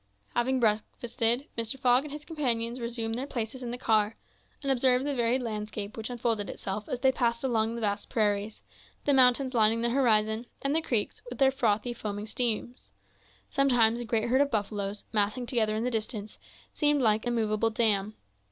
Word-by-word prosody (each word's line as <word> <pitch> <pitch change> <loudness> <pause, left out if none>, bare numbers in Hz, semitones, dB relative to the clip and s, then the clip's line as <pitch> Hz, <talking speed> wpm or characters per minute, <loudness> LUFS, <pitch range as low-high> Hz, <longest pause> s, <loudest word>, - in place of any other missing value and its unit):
Having 260 +2 +1
breakfasted, 230 +3 +1
Mr. 230 +3 -2
Fogg 255 +1 +3
and 300 - -8
his 295 0 -8
companions 245 -6 -1
resumed 235 -1 -3
their 255 +4 -3
places 240 0 -4
in 245 - -5
the 245 - -4
car, 220 -3 +2 0.5
and 275 - 0
observed 255 0 +3
the 290 - -1
varied 245 0 +1
landscape 210 -2 -5
which 220 +1 -5
unfolded 230 -4 -1
itself 200 +2 -5
as 245 - -3
they 265 0 +5
passed 235 -2 0
along 230 -3 0
the 235 - -5
vast 205 -1 -2
prairies, 210 -2 -1 0.4
the 285 - +3
mountains 260 0 +4
lining 225 0 +3
the 235 0 +1
horizon, 225 -3 +2 0.2
and 275 +2 +1
the 325 - +4
creeks, 235 -9 -1
with - - -7
their 270 -1 +4
frothy, 240 -3 0
foaming 205 -2 -5
streams. 240 +2 -2 0.6
Sometimes 240 -4 +3
a 240 - -4
great 225 0 0
herd 260 +3 +4
of 285 - +2
buffaloes, 205 -2 -2
massing 215 +4 0
together 220 -3 0
in 220 - -1
the 250 - -1
distance, 215 -2 -4 0.3
seemed 295 -3 +2
like 220 +1 +2
a - - +2
moveable 225 -1 +1
dam. 215 -2 +1
235 Hz, 185 wpm, -28 LUFS, 215-255 Hz, 0.6 s, they